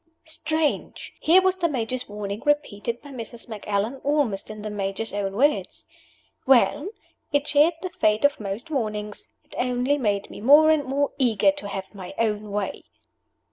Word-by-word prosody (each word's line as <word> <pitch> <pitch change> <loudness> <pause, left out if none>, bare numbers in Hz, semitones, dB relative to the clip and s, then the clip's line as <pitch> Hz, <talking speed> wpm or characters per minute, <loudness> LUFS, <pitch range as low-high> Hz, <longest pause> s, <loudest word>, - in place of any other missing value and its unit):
Strange! 315 -1 -2
Here 360 +4 +5
was 375 0 +2
the 340 -2 +1
Major's 255 -2 -3
warning 205 0 -5
repeated 240 -6 -1
by 285 - -11
Mrs. 235 -2 -8
Macallan, 210 +2 -2
almost 280 -9 0
in 215 -1 -8
the 215 - -4
Major's 200 +2 -3
own 200 -1 -2
words. 285 +8 0 0.6
Well! 265 - +4 0.4
It 290 0 +1
shared 300 +3 +4
the 370 - -4
fate 215 -5 +2
of 285 - +2
most 210 +9 -5
warnings. 215 - -3
It - - -18
only 250 +3 +1
made 205 -5 -1
me - - -9
more 295 +6 +7
and 305 -3 +2
more 275 +2 0
eager 245 +1 +4
to 290 -8 -7
have 195 0 -6
my 195 -1 -9
own 215 -2 -1
way. 205 -1 -3
240 Hz, 165 wpm, -24 LUFS, 210-290 Hz, 0.6 s, more